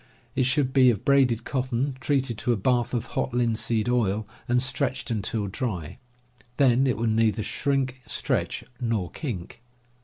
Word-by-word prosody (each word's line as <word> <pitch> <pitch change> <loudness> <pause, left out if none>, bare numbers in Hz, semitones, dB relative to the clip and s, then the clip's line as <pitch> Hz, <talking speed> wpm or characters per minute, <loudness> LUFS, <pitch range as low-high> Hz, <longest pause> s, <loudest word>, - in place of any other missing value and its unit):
It 125 - +2
should 130 -1 +1
be 130 -2 +6
of 110 -5 -1
braided 130 -5 +3
cotton, 130 +1 -1
treated 135 -2 0
to 125 - 0
a 120 - +1
bath 120 +3 +1
of 120 - -1
hot - - -1
linseed 115 -2 +1
oil, 110 -4 +1 0.2
and 120 +1 +3
stretched 130 -1 -1
until 105 -1 -1
dry; 95 - -4 0.6
then 135 -1 +4
it 125 -5 +1
will 115 - -1
neither 110 -1 +2
shrink, 135 +1 -1
stretch, - - -1 0.2
nor 110 -8 -1
kink. 115 - -6
120 Hz, 155 wpm, -26 LUFS, 110-130 Hz, 0.6 s, be